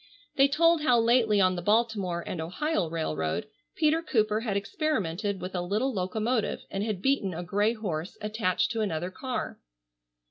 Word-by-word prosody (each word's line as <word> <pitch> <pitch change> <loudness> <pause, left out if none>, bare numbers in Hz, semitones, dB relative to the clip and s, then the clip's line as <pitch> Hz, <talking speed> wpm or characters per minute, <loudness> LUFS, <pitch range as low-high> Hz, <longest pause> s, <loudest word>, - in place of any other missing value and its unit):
They 275 -1 +6
told 330 +3 +3
how 250 -5 +4
lately 230 -2 +3
on 185 -1 +4
the 175 - -3
Baltimore 205 -4 +1
and 165 - -4
Ohio 185 - -1
railroad 80 - -2 0.3
Peter 315 0 +2
Cooper 215 -8 +1
had 220 -4 -1
experimented 200 - -1
with 185 +1 -6
a 180 - -1
little 215 +9 0
locomotive, 215 +4 -1
and 195 - -2
had 210 -4 -3
beaten 235 -10 +1
a 175 - -4
gray 205 +5 +1
horse 185 -5 -4
attached 210 -3 0
to 225 -1 -1
another 180 -3 -2
car. 255 +5 -4
210 Hz, 165 wpm, -28 LUFS, 180-235 Hz, 0.3 s, They